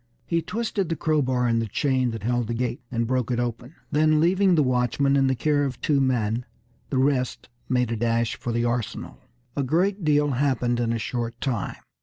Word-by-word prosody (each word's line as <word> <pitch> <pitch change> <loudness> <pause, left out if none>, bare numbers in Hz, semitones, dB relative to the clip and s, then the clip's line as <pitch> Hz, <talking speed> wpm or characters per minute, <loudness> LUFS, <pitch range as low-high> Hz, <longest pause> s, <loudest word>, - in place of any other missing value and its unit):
He 165 +4 0
twisted 205 0 -2
the 165 - 0
crowbar 130 -6 +1
in 115 -1 +2
the 115 - -1
chain 130 +3 +1
that 115 -3 -6
held 120 0 0
the 120 - -2
gate, 120 0 -2
and 115 -1 0
broke 125 0 0
it 120 -1 0
open; 120 +3 -4 0.2
then 155 +1 +3
leaving 185 +3 +4
the 155 - +4
watchman 130 +2 +1
in 135 -1 +3
the 130 - +2
care 145 +3 +1
of 135 -4 -3
two 145 -2 +2
men, 120 -3 0 0.5
the 135 - -1
rest 130 -1 0 0.2
made 125 -2 +1
a - - 0
dash 115 +1 0
for 120 - -4
the 120 +1 0
arsenal. 120 -2 -3 0.4
A 145 - 0
great 180 +8 +1
deal 145 -1 +3
happened 125 -2 +1
in 115 -1 0
a 115 - 0
short 115 +1 -3
time. 120 -8 -2
125 Hz, 205 wpm, -25 LUFS, 120-145 Hz, 0.5 s, leaving